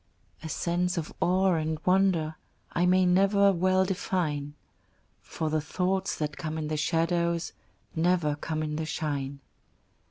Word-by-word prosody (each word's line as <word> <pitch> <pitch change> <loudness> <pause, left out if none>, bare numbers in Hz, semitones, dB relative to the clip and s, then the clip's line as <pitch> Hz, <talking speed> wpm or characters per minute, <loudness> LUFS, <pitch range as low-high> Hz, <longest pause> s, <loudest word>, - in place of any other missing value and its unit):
A 160 - -6
sense 175 +3 -1
of 160 - -4
awe 185 +1 +3
and 160 -1 -1
of 155 - -24
wonder 180 -4 +3 0.4
I 175 +1 +2
may 185 +1 +4
never 195 +2 +4
well 185 +1 +2
define, 160 -6 -2 0.7
For 155 -1 -4
the 155 0 +1
thoughts 190 +5 -1
that 150 -1 -3
come 155 -1 -4
in 155 -1 -3
the 155 - -1
shadows 170 +2 0 0.4
Never 165 -3 +2
come 155 +1 -3
in 150 0 -3
the 160 - -2
shine. 140 -4 -3
170 Hz, 150 wpm, -28 LUFS, 155-185 Hz, 0.7 s, may